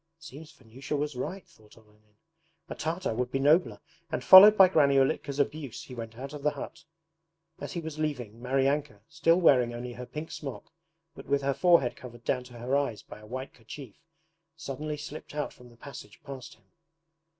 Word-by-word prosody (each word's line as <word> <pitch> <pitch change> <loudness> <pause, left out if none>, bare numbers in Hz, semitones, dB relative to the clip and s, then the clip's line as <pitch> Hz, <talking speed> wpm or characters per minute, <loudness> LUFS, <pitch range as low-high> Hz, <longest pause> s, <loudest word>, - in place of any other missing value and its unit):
'It 165 - -21
seems 155 +1 -11
Vanyusha 135 +1 -7
was 145 -1 -3
right!' 180 +9 -5
thought 105 0 -22
Olenin. 105 -1 -25 0.5
"A - - -5
Tartar 165 -2 -3
would 125 +2 -2
be 135 - 0
nobler",' 150 +6 +3 0.3
and - - -2
followed 205 +3 +10
by 190 - +9
Granny 145 -6 +3
Ulitka's 135 +1 +1
abuse 145 -3 -2
he 130 - -11
went 115 -2 -8
out 135 +3 -7
of 150 - -7
the 150 - +2
hut. 145 -2 -9 0.7
As - - -6
he 170 - -3
was 155 -1 -7
leaving, 120 -8 -4
Maryanka, 135 -3 0
still 165 +2 +2
wearing 125 -8 +4
only 120 +1 -6
her 125 +1 -8
pink 155 +2 -7
smock, 140 +1 -8 0.4
but - - -12
with 140 0 +1
her 140 0 +1
forehead 140 -3 +3
covered 120 -2 -12
down 125 +1 -1
to 125 - -14
her 125 +3 -1
eyes 140 -7 -1
by - - -12
a 105 - -14
white 130 +3 -6
kerchief, 120 0 -11 0.6
suddenly 150 +1 -5
slipped 150 0 -9
out 150 - -3
from 125 0 -16
the 120 - -20
passage 115 -5 -11
past 135 -3 -9
him. - - -31
135 Hz, 195 wpm, -28 LUFS, 120-150 Hz, 0.7 s, followed